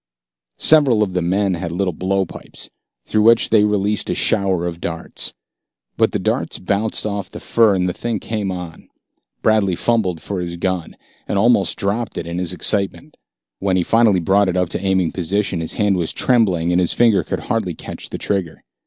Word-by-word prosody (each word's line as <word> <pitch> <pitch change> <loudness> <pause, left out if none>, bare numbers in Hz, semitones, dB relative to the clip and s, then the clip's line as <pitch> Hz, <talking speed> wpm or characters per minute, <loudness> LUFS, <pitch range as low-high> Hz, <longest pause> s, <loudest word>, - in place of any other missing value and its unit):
Several 140 -9 +4
of 95 -3 -3
the 90 - 0
men 95 +3 +1
had 85 -1 -4
little 90 +1 -1
blowpipes, 95 +1 -4 0.3
through 110 - +1
which 115 +2 +4
they 110 -2 +5
released 105 0 0
a - - 0
shower 95 -3 +1
of 85 -1 -5
darts. 85 -1 -5 0.6
But - - +2
the - - 0
darts - - -1
bounced 100 +5 -1
off 100 -2 -3
the - - -9
fur, 110 -4 +3
and 90 -1 0
the 90 - -1
thing 115 +1 -3
came 105 -3 -3
on. 90 -3 -8 0.5
Bradley 105 -4 +3
fumbled 100 -6 0
for 100 +2 -4
his 85 0 -5
gun, 90 -1 -3 0.3
and - - -1
almost 100 -4 +3
dropped 105 +4 -2
it 85 - -3
in 85 +1 -4
his 90 -2 -2
excitement. 100 +2 -2 0.4
When 95 -1 +1
he 90 - +2
finally 115 -2 +3
brought 95 +3 +2
it 90 - -1
up 90 -2 +1
into - - -3
aiming 95 -3 +1
position, 95 +1 -1
his 80 - -2
hand 100 -3 +1
was 85 -2 -1
trembling, 95 -10 +2
and 90 +1 +3
his 90 - +2
finger 115 -4 +3
could - - -4
hardly - - -2
catch - - -8
the - - -5
trigger. 95 -6 -3
95 Hz, 190 wpm, -19 LUFS, 90-105 Hz, 0.6 s, they